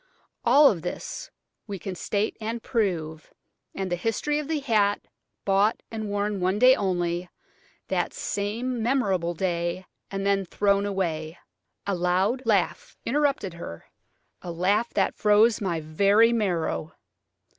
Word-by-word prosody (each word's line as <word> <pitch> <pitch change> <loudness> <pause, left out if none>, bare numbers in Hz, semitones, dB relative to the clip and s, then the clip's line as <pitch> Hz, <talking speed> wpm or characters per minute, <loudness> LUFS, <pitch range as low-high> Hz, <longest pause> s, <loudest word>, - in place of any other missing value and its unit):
"All 285 -4 +6
this 180 -1 -6 0.4
we 200 -2 -4
can 190 +2 -5
state 205 +4 -1
and 225 +1 -4
prove, 165 -9 -2 0.4
and 190 -2 -3
the - - +2
history 225 - -1
of 300 - -5
the 315 -1 0
hat, 215 -7 +2 0.5
bought, 200 +3 +2
and 220 -2 -4
worn 205 0 -1
one 185 +2 +1
day 255 +3 +7
only, 175 -2 -1 0.6
that - - 0
same 230 +5 -3
memorable 195 -9 +1
day, 175 +1 -2 0.2
and 195 0 -3
then 200 0 +2
thrown 200 +2 +1
away." 165 -5 -2 0.5
A 200 - 0
loud 185 +7 +1
laugh 200 -5 0
interrupted 280 - 0
her–a 170 - -11
laugh 200 +7 +1
that - - +2
froze 215 +2 +4
my 175 -5 -1
very 200 +9 +4
marrow. 175 -7 -1
200 Hz, 130 wpm, -26 LUFS, 180-225 Hz, 0.6 s, day